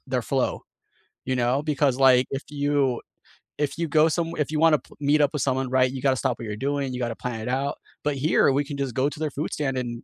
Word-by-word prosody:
their 125 -1 -1
flow. 130 +2 -1 0.6
You 130 0 0
know, 125 +3 +1
because, 145 -4 +1
like, 130 -1 +5
if 135 +1 -3
you 145 -3 0 0.6
if 150 +1 -1
you 170 -1 -1
go 155 +1 +4
somew 165 +1 -2
if 150 +1 0
you 155 - -1
wanna 160 -2 +5 0.2
meet 145 +1 +3
up 145 - +3
with 150 - -2
someone, 130 -1 0
right? 130 0 +3
You 130 -1 -6
gotta 135 -1 +3
stop 125 -3 -1
what 115 - -6
you're 105 -1 -5
doing, 140 0 -2
you 125 - -4
gotta 120 -2 -2
plan 120 -3 -5
it 110 - -6
out, 135 +2 -1 0.3
but 150 -1 0
here 140 0 +3
we 140 +2 +1
can 140 0 -6
just 135 -4 -2
go 135 +2 +2
to 150 - -10
their 155 -2 -2
food 150 +4 -4
stand 135 -3 -1
and 120 -2 -4
135 Hz, 250 wpm, -25 LUFS, 130-145 Hz, 0.6 s, like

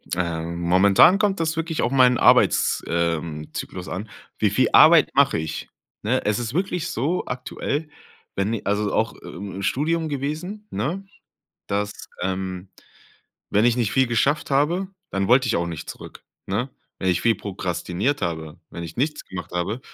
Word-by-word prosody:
Ähm, 85 -1 -3
momentan 95 - +5
kommt 205 -3 +1
das 165 0 0
wirklich 165 0 -2
auf 120 - 0
meinen 125 -2 +5
Arbeits - - +4
ähm, 85 -2 -2
zyklus 90 0 -6
an. 105 +4 -5 0.3
Wie 105 - +3
viel 130 +6 +2
Arbeit 160 -1 +7
mache 140 -7 +4
ich? 80 -1 -5 0.3
Ne? 125 +5 0
Es 105 +1 +1
ist 120 0 -4
wirklich 180 -1 -1
so 150 +10 -1
aktuell, 140 +4 -3 0.5
wenn 100 +3 0
i 115 - -2
also 105 +1 0
auch - - +1
i - - -16
i - - -9
im 100 +1 -6
Studium 160 - 0
gewesen, 155 +9 -4
ne? 160 - -3 0.6
Dass, 100 +1 -1 0.3
ähm, 95 0 -3 0.8
wenn 105 +2 +3
ich 120 -1 +3
nicht 115 -5 0
viel 130 0 +3
geschafft 140 +7 +1
habe, 160 +8 +1 0.2
dann 95 0 -1
wollte 125 +2 +5
ich 115 - +1
auch 85 - 0
nicht 85 -2 -6
zurück, - - -11 0.2
ne? 115 +8 -2 0.3
Wenn 95 - +1
ich 90 -1 +1
viel 115 - +4
prokrastiniert 95 - -2
habe, 80 -2 -4
wenn 85 - -6
ich 80 -1 -9
nichts 150 +4 -1
gemacht 95 - -8
habe, 90 +7 -2
110 Hz, 170 wpm, -23 LUFS, 95-145 Hz, 0.8 s, Arbeit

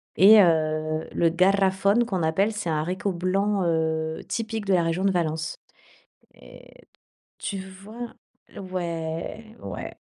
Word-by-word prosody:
et, 210 +3 +8
heu, 155 -2 +1
le 170 - +3
garrofón 195 +5 +3
qu'on 190 -6 -2
appelle, 195 +7 +2
c'est 210 -5 -4
un 155 -1 0
haricot 185 +4 -2
blanc, 195 +3 0
heu, 160 -1 0
typique 225 -2 -3
de 195 - +2
la 175 -2 +3
région 165 +3 -1
de 195 - +4
Valence. 160 -2 -2 0.8
Et - - -16 0.5
tu 195 - -4
vois? 200 +5 -9 0.4
Ouais, 180 +4 -5
ouais. - - -6
185 Hz, 130 wpm, -25 LUFS, 160-200 Hz, 0.8 s, et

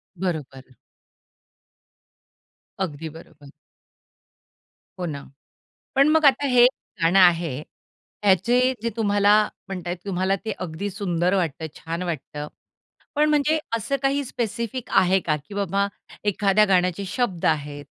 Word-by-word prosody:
बरोबर. 145 -8 -5 2.0
अगदी 160 -4 -3
बरोबर. 155 -2 -14 1.5
हो 180 - -2
ना. 145 -4 -5 0.7
पण 275 +2 +5
मग 315 0 +4
आता 275 +1 +5
हे 245 -2 +6 0.4
गाणं 170 +4 +4
आहे, 170 -5 +4 0.7
याचे 195 +5 +4 0.3
जे 230 - +1
तुम्हाला 205 -2 +3 0.3
म्हणत 180 -2 -6
आहेत 175 - -2
तुम्हाला 190 0 0
ते 220 - -1
अगदी 180 +3 -4
सुंदर 180 -2 -1
वाटत 165 -5 -1
छान 165 +2 -5
वाटतं. 150 -3 -5 0.7
पण 300 +1 +3
म्हणजे 300 +1 +3 0.2
असं 230 +5 -1
काही 275 +1 +1
स्पेसिफिक 235 0 -4
आहे 190 +1 +3
का, 160 -4 0
की 150 +8 -14
बाबा 200 0 0 0.4
एखाद्या 205 +1 +3
गाण्याचे 185 0 +1
शब्द 190 -4 -2
आहेत, 145 -1 -1
190 Hz, 120 wpm, -23 LUFS, 165-220 Hz, 2.0 s, हे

